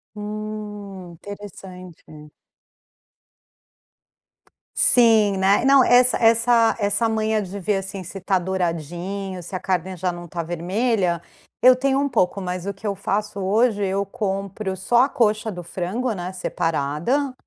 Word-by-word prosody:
Hum, 210 -3 -7
interessante. 180 -5 -11 2.4
Sim, 220 -5 +4
né? 195 +5 +3
Não, 275 -1 +6
essa 250 +1 +5
essa 230 0 +4
essa 205 +3 +1
manha 220 -1 0
de 195 +1 -6
ver 200 +2 0
assim, 195 0 -5
se 195 +2 -8
tá 190 0 +1
douradinho, 180 +1 -3
se 175 - -10
a - - -2
carne 185 0 -2
já 180 +1 -1
não 175 0 -9
tá 170 +1 -3
vermelha, 180 +2 -1 0.4
eu 255 0 +7
tenho 270 +1 +1
um 285 - +1
pouco, 205 -7 0
mas 180 0 -4
o 200 - -3
que 200 +2 -7
eu 200 - -1
faço 200 +1 -2
hoje, 210 +2 +2
eu 195 +1 -1
compro 195 0 -3
só 240 +6 +3
a 270 - +1
coxa 215 -3 +1
do 180 -2 -7
frango, 190 +8 -3
né, 180 -1 -5
separada, 175 - -1
200 Hz, 140 wpm, -22 LUFS, 180-220 Hz, 2.4 s, eu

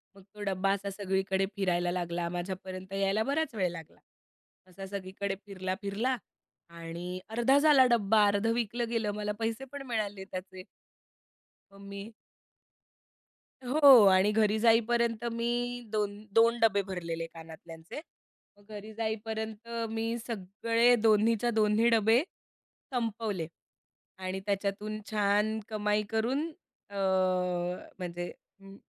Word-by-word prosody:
मग 195 - -15
तो 210 - -11
डब्बा 195 0 0
असा 200 0 -3
सगळीकडे 195 -1 0
फिरायला 175 -3 0
लागला, 175 -1 -2
माझ्यापर्यंत 185 +1 -6
यायला 195 +2 +1
बराच 280 -2 -1
वेळ 185 -3 +1
लागला. 165 -3 -11 0.7
असा 195 +2 -9
सगळीकडे 195 0 -4
फिरला-फिरला 200 +5 -2 0.5
आणि 170 +2 -6
अर्धा 240 +4 +3
झाला 285 -3 +6
डब्बा, 215 -2 +4
अर्धं 205 +3 +1
विकलं 235 0 -2
गेलं, 225 -3 0
मला 210 0 -2
पैसे 225 +3 -2
पण 285 -1 -6
मिळाले 205 -4 -2
त्याचे. 185 0 -8 1.1
मग 195 - -15
मी 200 0 -7 1.6
हो. 265 -3 +8
आणि 190 +2 +4
घरी 215 0 +2
जाईपर्यंत 230 0 +3
मी 240 +1 -1
2 205 -1 -1
2 230 +1 +5
डब्बे 205 -3 +4
भरलेले 165 -3 -4
कानातल्यांचे. 165 - -10 0.6
मग 205 - -22
घरी 215 +2 -9
जाईपर्यंत 220 0 -4 0.2
मी 225 0 -2 0.2
सगळे 230 +3 +2
दोन्हीच्या 225 +1 +3
दोन्ही 220 +1 +3
डबे, 225 +2 +4 0.7
संपवले 220 -7 -2 0.7
आणि 185 0 -4
त्याच्यातून 205 +1 -2
छान 210 +1 +2
कमाई 210 -1 0
करून 245 +7 0 0.4
अ, 200 - -9 1.0
म्हणजे 175 -1 -5 0.3
अं, 195 0 -13
210 Hz, 115 wpm, -30 LUFS, 190-230 Hz, 1.6 s, हो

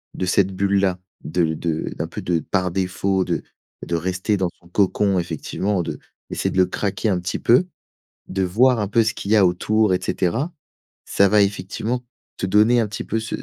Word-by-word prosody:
de 95 - -2
cette 95 +1 +2
bulle-là, 100 -1 +1 0.2
de 80 0 0
de 80 0 -2
d'un - - -2
peu - - -7
de 85 -2 0
par 90 +3 -1
défaut 95 +1 0
de - - -2 0.4
de 85 - -2
rester 95 +4 -1
dans 95 -2 0
son 85 - -20
cocon, 100 0 +2
effectivement, 90 +3 -2
de - - -5 0.3
d'essayer - - -1
de - - -4
le 95 - +6
craquer 105 +3 -2
un 90 - +1
petit 90 +1 -3
peu, 125 +10 +4 0.6
de 95 0 -1
voir 120 +7 +3
un 105 - -1
peu 115 +2 +3
ce 110 +1 0
qu'il 100 - -5
y 110 - +6
a 100 -3 +6
autour 105 +3 +2
et 90 - +1
cetera, 120 - -1 0.5
ça 100 - +3
va 105 +1 +5
effectivement, 105 +5 -3 0.3
te - - -2
donner 110 +5 +4
un 110 - 0
petit 105 - -5
peu 110 - -1
ce 110 0 -4
95 Hz, 200 wpm, -22 LUFS, 90-105 Hz, 0.6 s, le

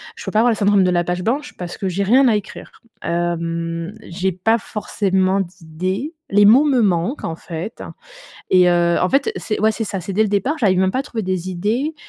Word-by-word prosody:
je 465 - -10
peux - - -3
pas 215 - +2
avoir 240 +1 +4
le - - 0
syndrome 200 -1 +3
de 180 - +2
la 175 -1 +2
page 180 +1 -3
blanche, 290 +6 -2
parce 175 -1 -6
que 190 - -2
j'ai 195 +3 -1
rien 255 +6 +4
à 225 - +3
écrire. 210 - -6 0.3
Hem, 170 +1 -2
j'ai 185 +2 -2
pas 225 +6 +1
forcément 195 -3 0
d'idées. 185 - -4 0.2
Les 205 +1 +4
mots 245 +9 +7
me 260 -5 +3
manquent, 190 - 0
en 165 0 -4
fait 170 +5 -7 0.7
et 180 -1 +5
heu 170 0 +2
en 180 - +2
fait, 280 +11 +1
c'est 215 - -3
ouais, 220 +1 +4
c'est 225 +1 -3
ça, 195 -2 -4
c'est 195 +3 -6
dès 215 - +2
le - - -1
départ. 255 +10 0
J'arrive 190 -5 +2
même 190 0 +2
pas 255 - -2
à - - 0
trouver 235 -6 -5
des 185 -1 -2
idées. 220 - -1
195 Hz, 230 wpm, -19 LUFS, 175-225 Hz, 0.7 s, mots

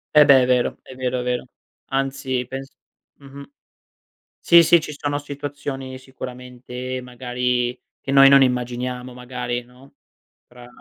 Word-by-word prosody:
Eh 150 -1 +8
beh, 140 -2 +7
è - - +2
vero. 125 -1 +1
È - - -13
vero, 125 0 -2
è - - -5
vero. 125 0 -2 0.4
Anzi 135 -1 -2
pens 135 +2 -7 0.5
mh-mh 140 0 -12 0.9
sì, 170 0 +7
sì 170 +1 +5
ci 150 -1 -7
sono 145 0 -2
situazioni 145 -2 -6
sicuramente, 125 0 -7
magari, 125 0 -2 0.2
che - - -6
noi, 135 0 +8
non 140 0 +7
immaginiamo 125 0 -2
magari, 125 0 -5
no, 125 +3 -20 0.5
fra 120 0 -15
130 Hz, 140 wpm, -22 LUFS, 125-135 Hz, 0.9 s, Eh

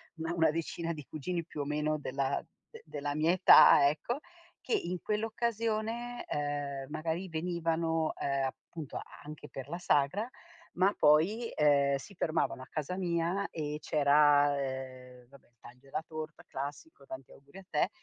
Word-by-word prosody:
una 165 0 -3
una 165 -2 +3
decina 165 +1 -3
di 150 -3 -9
cugini 170 +5 -3
più 155 - -9
o 145 - -1
meno 150 +1 0
della 135 -1 -1 0.3
de 455 - -12
della 145 0 -4
mia 155 +2 +3
età, 180 -5 +8
ecco, 235 - -3 0.4
che - - -3
in 180 - -1
quell'occasione, 225 +2 -2
uhm, 145 -2 -2
magari 165 +4 -3
venivano, 165 -1 -1
uhm, 140 -1 -1
appunto, 150 +3 -6 0.3
anche 150 0 -9
per 135 -1 -7
la 170 - -3
sagra, 165 +6 +1 0.5
ma 190 +3 +3
poi, 175 +11 +3
uhm, 140 -2 +4
si 170 +9 -8
fermavano 160 -6 -1
a 130 - -10
casa 155 +3 -3
mia 175 +2 0
e 150 -2 -4
c'era, 145 -1 +4
ehm, 130 -2 -6
vabbè 140 +1 -19
il 120 - -36
taglio 125 +3 -14
della 140 +3 -5
torta 155 0 -7
classico, 140 +1 -7
tanti 130 -1 -9
auguri 140 +6 -16
a 195 - -11
te - - +1
155 Hz, 155 wpm, -31 LUFS, 140-175 Hz, 0.5 s, età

